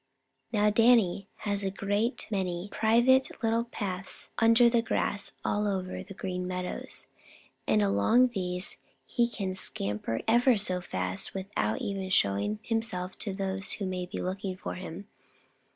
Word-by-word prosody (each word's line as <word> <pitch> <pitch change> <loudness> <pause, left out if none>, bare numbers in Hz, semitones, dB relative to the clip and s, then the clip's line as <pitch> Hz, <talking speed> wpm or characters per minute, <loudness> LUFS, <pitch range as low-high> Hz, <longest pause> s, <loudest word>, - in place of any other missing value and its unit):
Now 210 -2 +3
Danny 215 -4 +4 0.2
has 205 -1 +1
a 195 - 0
great 205 +5 -1
many 185 -1 -2
private 240 +4 +4
little 230 +1 +2
paths 195 -5 -4
under 230 +1 +6
the 235 0 +3
grass 205 -2 0
all 210 0 +1
over 185 -2 -3
the 195 - -10
Green 180 -1 -4
Meadows, 180 0 -3 0.6
and 105 -1 +3
along 100 - +4
these 180 -4 -1 0.3
he 240 -1 +1
can 195 -5 -4
scamper 105 - -1
ever 240 +1 +5
so 185 -3 +2
fast 95 - -2
without 185 - -2
once 190 -1 -3
showing 100 +2 +2
himself 220 -5 -2
to 205 - -1
those 195 +1 -3
who 200 - -3
may 180 -1 -3
be - - -6
looking 190 0 -3
for - - -5
him. 185 +2 -8
195 Hz, 145 wpm, -29 LUFS, 180-225 Hz, 0.6 s, under